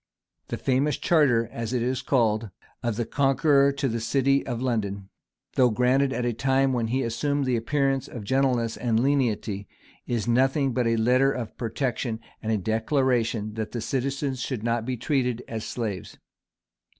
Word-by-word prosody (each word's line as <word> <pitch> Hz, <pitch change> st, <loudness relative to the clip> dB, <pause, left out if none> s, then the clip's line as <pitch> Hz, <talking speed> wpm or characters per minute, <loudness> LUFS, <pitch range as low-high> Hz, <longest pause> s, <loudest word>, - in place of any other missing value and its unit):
[] -, -, -55 dB
The -, -, -4 dB
famous 135 Hz, +3 st, +1 dB
charter, 130 Hz, -9 st, +3 dB
as 115 Hz, +1 st, -4 dB
it 120 Hz, -2 st, 0 dB
is 130 Hz, +1 st, -1 dB
called, 110 Hz, -4 st, +1 dB, 0.3 s
of 120 Hz, -3 st, -1 dB
the 120 Hz, +1 st, -1 dB
Conqueror 140 Hz, +2 st, +3 dB
to 140 Hz, 0 st, -1 dB
the 115 Hz, -1 st, -2 dB
city 135 Hz, +4 st, +2 dB
of 120 Hz, -3 st, -2 dB
London, 100 Hz, -6 st, -2 dB, 0.4 s
though 125 Hz, -2 st, +4 dB
granted 125 Hz, +4 st, +2 dB
at 125 Hz, -2 st, -2 dB
a 120 Hz, -, 0 dB
time 135 Hz, +2 st, +2 dB
when 120 Hz, -2 st, 0 dB
he 130 Hz, +4 st, 0 dB
assumed 140 Hz, +5 st, -1 dB
the 130 Hz, -1 st, +1 dB
appearance 135 Hz, +2 st, 0 dB
of 115 Hz, -, -8 dB
gentleness 125 Hz, -1 st, +1 dB
and 115 Hz, -2 st, +1 dB
lenity, 115 Hz, -7 st, 0 dB, 0.4 s
is 120 Hz, -2 st, -1 dB
nothing 135 Hz, +3 st, +2 dB
but 125 Hz, -1 st, +1 dB
a 115 Hz, 0 st, +2 dB
letter 125 Hz, +4 st, +3 dB
of 120 Hz, -5 st, -5 dB
protection, 120 Hz, 0 st, -2 dB, 0.2 s
and 110 Hz, -, -2 dB
a 110 Hz, -, +2 dB
declaration 115 Hz, 0 st, 0 dB
that 110 Hz, -1 st, -4 dB
the 120 Hz, -, -2 dB
citizens 135 Hz, +2 st, -2 dB
should 120 Hz, -3 st, -3 dB
not 115 Hz, -1 st, 0 dB
be 130 Hz, -1 st, -2 dB
treated 125 Hz, -2 st, 0 dB
as 110 Hz, -1 st, -5 dB
slaves. 105 Hz, -7 st, -4 dB
125 Hz, 175 wpm, -26 LUFS, 115-135 Hz, 0.4 s, though